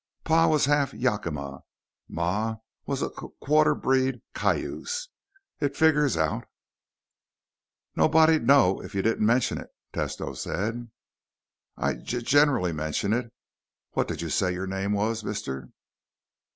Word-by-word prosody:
"Pa 165 +1 +4
was 155 -4 +3
half 145 -1 +1
Yakima. 80 - -2 0.5
Ma 105 +7 -1 0.3
was - - -1
a - - -2
q - - -10
quarter 155 +2 +3
breed 130 -2 +1
Cayuse. 485 +1 -2 0.5
It 140 -1 -1
figures 150 - +3
out." 80 -1 0 1.5
"Nobody'd 160 -4 +4
know 130 -10 +5
it - - -9
if 100 - -10
you 95 - 0
didn't 115 -1 +1
mention 120 +3 +2
it," - - -10 0.2
Tesno - - -3
said. 115 +5 -3 0.9
"I - - 0
g 120 - -4
generally 135 - +3
mention 80 +7 -1
it. 120 0 -2 0.6
What - - 0
did 85 - -4
you 85 - -4
say 90 -1 +1
your 90 +1 -3
name 95 +1 -2
was, 110 +2 -1
mister?" 70 -12 -5
115 Hz, 135 wpm, -26 LUFS, 95-145 Hz, 1.5 s, know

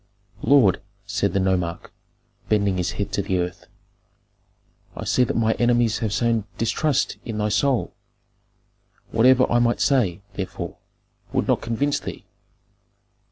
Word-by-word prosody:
"Lord," 130 -10 +4 0.2
said - - -1
the 100 - +2
nomarch, 90 -3 -1 0.6
bending 100 -3 +2
his 90 -1 -1
head 100 - -4
to - - 0
the 95 -1 -1
earth, 90 0 -4 1.3
"I - - -6
see 125 - +3
that 120 - -1
my 110 -1 +2
enemies 120 -2 +2
have 110 -3 -2
sown 115 0 +1
distrust 140 +5 0
in 115 -3 -5
thy 105 0 0
soul; 110 -2 +1 1.2
whatever 130 +3 +5
I 120 - +4
might 120 0 +2
say, 105 -10 +1
therefore, 95 -2 -5 0.6
would - - 0
not - - +2
convince 130 +6 0
thee. - - -8
110 Hz, 135 wpm, -23 LUFS, 100-120 Hz, 1.3 s, whatever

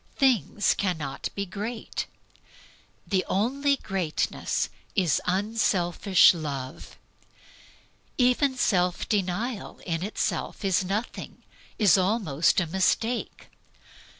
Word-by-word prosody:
Things 230 - +2
cannot 160 -8 -3
be 200 - -2
great. 215 +5 -5 1.0
The 190 -2 +1
only 275 +8 +1
greatness 190 - -2 0.3
is 175 -7 +2
unselfish 190 -2 +3
love. 140 -6 -6 1.2
Even 260 +2 +3
self 180 -6 +1
denial 205 +3 -2
in 165 -2 -2
itself 205 +1 -2
is 190 -1 +2
nothing, 205 +6 -4 0.3
is 200 -3 +5
almost 185 -7 +2
a 175 - 0
mistake. 190 +7 -1
195 Hz, 90 wpm, -26 LUFS, 175-225 Hz, 1.2 s, is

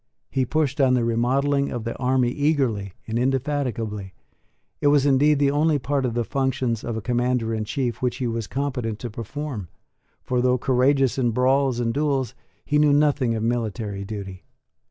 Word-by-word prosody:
He 130 -2 0
pushed 145 -1 0
on 130 -1 +4
the 120 -2 +1
remodelling 135 +5 +1
of 120 -2 -4
the 115 - -4
army 125 -1 +2
eagerly 130 - 0
and 115 +1 -2
indefatigably. 125 -7 -2 0.7
It - - +3
was 145 -1 +4
indeed 145 +2 +4
the 140 0 +3
only 150 +1 +2
part 140 0 -1
of 120 - -4
the 120 - +1
functions 130 -3 -1
of 115 -2 -3
a 110 - -5
Commander 120 -1 0
in 110 -1 -2
Chief 120 0 -2
which 125 -1 0
he 130 - -2
was 115 -2 -2
competent 125 -5 -2
to 120 +1 -6
perform; 115 - -5 0.6
for, 125 -1 0
though 125 0 +3
courageous 130 +1 +2
in 120 -2 +2
brawls 130 +1 +2
and 115 -1 0
duels, 140 -4 0 0.3
he 150 0 +2
knew 150 -1 +5
nothing 145 -5 +2
of 110 - -2
military 110 -4 -2
duty. 100 -2 -7
125 Hz, 175 wpm, -23 LUFS, 115-140 Hz, 0.7 s, knew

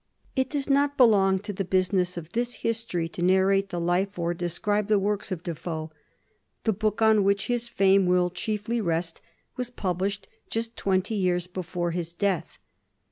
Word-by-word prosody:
It 260 -1 +1
does 285 -2 -2
not 285 0 +2
belong 200 -6 +5
to 205 - -3
the 195 - -2
busi 185 0 +1
ness 180 -2 +1
of 170 0 -7
this 240 +2 -1
history 225 -7 -1
to 170 +1 -7
narrate 190 +2 +3
the 175 - -3
life 180 +4 0
or 170 0 0
describe 180 +4 -1
the 215 -1 +4
works 205 +1 -1
of 175 -2 -4
Defoe. 160 -2 -5 0.7
The 220 - +2
book 215 +2 0
on 220 -2 +5
which 200 0 +2
his 240 -1 -1
fame 195 -2 +4
will 180 0 +3
chief 210 +3 -3
ly 235 +1 0
rest 165 -4 -2 0.4
was 250 -1 -3
published 195 -2 -2 0.2
just 230 +1 -3
twenty 190 +2 0
years 180 -4 +1
before 180 -1 -3
his 170 0 -4
death. 180 -3 -1
195 Hz, 180 wpm, -26 LUFS, 175-215 Hz, 0.7 s, belong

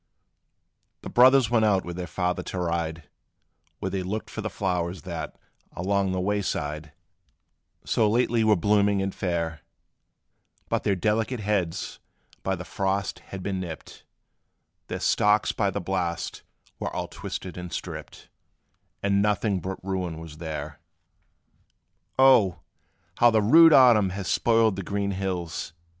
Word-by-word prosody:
The - - -7
brothers 130 -1 +6
went 115 -2 +3
out 100 -3 +2
with 85 0 -6
their 90 0 -5
father 90 +2 -1
to - - -6
ride, 85 -3 -2 0.7
Where - - -4
they 95 - -2
looked 100 +4 -4
for 110 - -5
the 110 - -3
flowers, 90 -4 -2
that, 85 -3 -6 0.4
along 95 +1 0
the 95 - -1
way 100 +2 0
side, 75 -4 -3 0.9
So 110 - +2
lately 115 0 +2
were 110 -1 +5
blooming 100 +2 +2
and 95 0 -2
fair; 85 -4 -2 1.1
But - - 0
their 100 - +1
delicate 110 +5 0
heads 100 -5 -2 0.4
by 95 - -1
the 90 0 -8
frost 95 +1 -2
had 95 -1 -7
been 95 -1 -2
nipped; 85 -4 -8 0.8
Their - - -4
stalks 105 +1 +3
by 100 -3 0
the 95 - -3
blast 90 -2 -3 0.4
were - - -3
all - - -3
twisted 90 - -7
and 90 -1 -7
stripped; - - -7 0.8
And 100 0 +2
nothing 105 -1 +1
but 95 +2 -5
ruin 90 -4 -3
was 80 -1 -10
there. 75 -3 -6 1.4
"Oh! 115 - +5 0.6
how 120 - +7
the 110 -2 +2
rude 165 +9 +8
autumn 120 -8 +6
has 95 0 -5
spoiled 115 -4 +3
the - - -2
green 100 +1 -2
hills!" 90 -4 -4
95 Hz, 145 wpm, -26 LUFS, 85-105 Hz, 1.4 s, rude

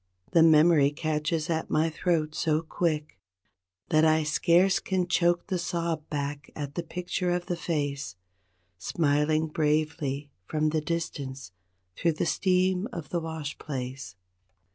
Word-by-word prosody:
The 165 - +5
memory 160 -2 +6
catches 155 +1 -1
at 160 -2 -1
my 155 +1 +2
throat 155 -2 0
so 155 0 0
quick 155 -2 -2 0.7
That 155 0 +4
I 160 0 +4
scarce 170 +5 +3
can 185 -2 -1
choke 175 -1 +2
the 185 -3 -2
sob 170 -2 -2
back 145 0 -4
at 145 -2 -5
the 175 - -2
picture 180 +1 -3
of 175 0 0
the 175 - -2
face 145 - -3 0.6
Smiling 155 - +1
bravely 150 -2 -1 0.2
from 155 0 +1
the 155 0 0
distance 140 - -4 0.4
through 170 -1 +1
the 155 - -1
steam 185 +2 +1
of 170 -9 -7
the 175 - -1
wash 160 -3 -5
place. 130 - -6
155 Hz, 140 wpm, -28 LUFS, 150-170 Hz, 0.7 s, memory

